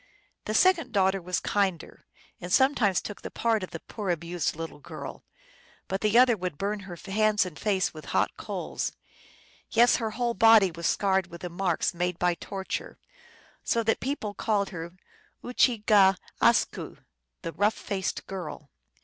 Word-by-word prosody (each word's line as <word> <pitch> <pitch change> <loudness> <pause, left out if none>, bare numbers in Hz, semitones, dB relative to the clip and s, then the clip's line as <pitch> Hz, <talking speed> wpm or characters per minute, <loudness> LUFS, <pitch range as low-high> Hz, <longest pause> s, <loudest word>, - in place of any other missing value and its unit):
The 215 - -2
second 330 -5 +3
daughter 190 -1 +2
was 180 +1 -1
kinder, 195 -5 -2 0.3
and 175 - -7
sometimes 240 -6 +3
took 205 - -7
the - - -6
part 225 -2 0
of 185 - -5
the 165 - -8
poor 210 -4 -6
abused 170 0 -1
little 165 -1 -7
girl, - - -9 0.6
but 190 +1 -2
the 215 +2 +3
other 250 -1 +6
would 180 -6 -4
burn 205 +4 -2
her 190 -3 -8
hands 210 +1 +2
and 170 -5 -8
face 195 -3 0
with 155 -1 -10
hot - - 0
coals; - - -4 0.8
yes, 240 +2 +5
her 225 -3 -2
whole 235 +2 -1
body 225 -3 +6
was 170 +1 -3
scarred 190 -2 +1
with 170 -1 -11
the 180 - -5
marks 175 -1 0
made 175 0 -2
by 180 0 +2
torture, 190 +2 -5 0.7
so 230 - +1
that 225 0 +1
people 245 -6 -3
called 205 -2 0
her 170 0 -7 0.5
Oochige 210 -6 +4 0.2
askw - - +2 0.5
(the 165 - -3
rough 210 +2 +2
faced 190 -2 -3
girl). 175 -6 -7
195 Hz, 160 wpm, -27 LUFS, 180-220 Hz, 0.8 s, other